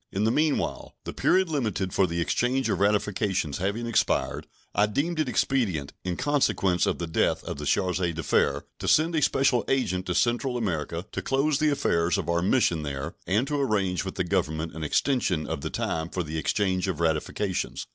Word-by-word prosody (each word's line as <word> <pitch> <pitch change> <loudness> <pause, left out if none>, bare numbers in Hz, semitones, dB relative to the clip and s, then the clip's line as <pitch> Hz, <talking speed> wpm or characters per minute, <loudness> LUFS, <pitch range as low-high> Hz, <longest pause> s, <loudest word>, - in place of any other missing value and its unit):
In 100 - -1
the 110 - +3
meanwhile, 150 +2 0
the - - -6
period 190 0 +3
limited 110 - -2
for 95 - +3
the 85 0 -3
exchange 125 +9 0
of - - -1
ratifications 100 -5 0
having 100 +6 -1
expired, 115 -2 0 0.3
I 105 - +3
deemed 155 +10 -1
it 155 -4 +1
expedient, 105 - 0
in 90 -1 -3
consequence 130 -10 +1
of - - 0
the 85 - -3
death 80 - 0
of - - -5
the 75 - -4
charge 90 +3 +1
d'affaires, 85 -3 +1 0.2
to - - -4
send 160 +2 +4
a 160 - +1
special 135 -4 +3
agent 95 -9 0
to 90 - -1
Central 120 +1 +1
America 85 -5 -2
to - - -3
close 140 +2 +1
the 155 0 +3
affairs 90 - +1
of - - -3
our 85 0 +2
mission 90 -5 +2
there 70 -2 -4
and 105 +8 +2
to 145 0 -1
arrange 100 -8 0
with 95 - -6
the 90 - 0
Government 80 -4 -1
an 80 +1 -6
extension 90 - +1
of 70 - -4
the - - -3
time 80 0 -2
for 90 - -2
the 80 0 -4
exchange 95 +2 0
of 90 -5 -2
ratifications. 85 +4 -1
95 Hz, 195 wpm, -26 LUFS, 85-130 Hz, 0.3 s, send